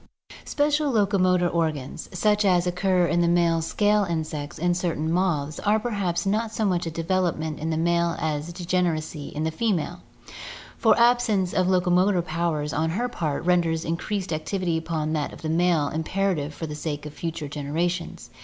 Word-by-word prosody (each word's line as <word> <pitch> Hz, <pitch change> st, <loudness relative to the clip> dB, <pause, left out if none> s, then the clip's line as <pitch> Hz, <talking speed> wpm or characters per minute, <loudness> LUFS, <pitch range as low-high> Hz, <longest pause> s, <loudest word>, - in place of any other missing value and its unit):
Special 295 Hz, 0 st, +1 dB
locomotor 190 Hz, -6 st, +2 dB
organs, 160 Hz, -5 st, -2 dB
such 210 Hz, +3 st, +2 dB
as 180 Hz, -3 st, +3 dB
occur 180 Hz, 0 st, +2 dB
in 175 Hz, 0 st, +1 dB
the 170 Hz, -, +3 dB
male 170 Hz, -1 st, +3 dB
scale 205 Hz, +5 st, +2 dB
insects 155 Hz, -4 st, -4 dB
and 175 Hz, +1 st, +1 dB
certain 165 Hz, -3 st, -1 dB
moths, 165 Hz, -5 st, 0 dB
are 210 Hz, +1 st, +2 dB
perhaps 200 Hz, -7 st, -1 dB
not 215 Hz, +3 st, 0 dB
so 220 Hz, -1 st, -1 dB
much 180 Hz, -3 st, 0 dB
a -, -, -1 dB
development 165 Hz, -2 st, -1 dB
in 160 Hz, -, -3 dB
the 160 Hz, -, 0 dB
male 170 Hz, +1 st, +1 dB
as 155 Hz, +1 st, -2 dB
degeneracy 170 Hz, -4 st, -1 dB
in 150 Hz, -, -4 dB
the 160 Hz, -, 0 dB
female, 175 Hz, -2 st, -1 dB, 0.7 s
for 225 Hz, -4 st, +3 dB
absence 235 Hz, -6 st, +3 dB
of 185 Hz, 0 st, +2 dB
locomotive 180 Hz, 0 st, +3 dB
powers 155 Hz, -3 st, -1 dB
on 160 Hz, +2 st, 0 dB
her 225 Hz, +9 st, -1 dB
part 160 Hz, -10 st, -3 dB
renders 170 Hz, -2 st, +2 dB
increased 185 Hz, +3 st, -2 dB
activity 170 Hz, +2 st, -1 dB
upon 160 Hz, -1 st, -2 dB
that 150 Hz, -2 st, -2 dB
of -, -, -12 dB
the 155 Hz, -, -2 dB
male 165 Hz, -3 st, +2 dB
im 160 Hz, +1 st, -1 dB
perative 185 Hz, -6 st, -1 dB
for 160 Hz, -, -6 dB
the 150 Hz, -, -6 dB
sake 150 Hz, 0 st, -4 dB
of 150 Hz, -, -7 dB
future 160 Hz, -2 st, -4 dB
generations. 160 Hz, +5 st, -3 dB
170 Hz, 175 wpm, -25 LUFS, 160-190 Hz, 0.7 s, as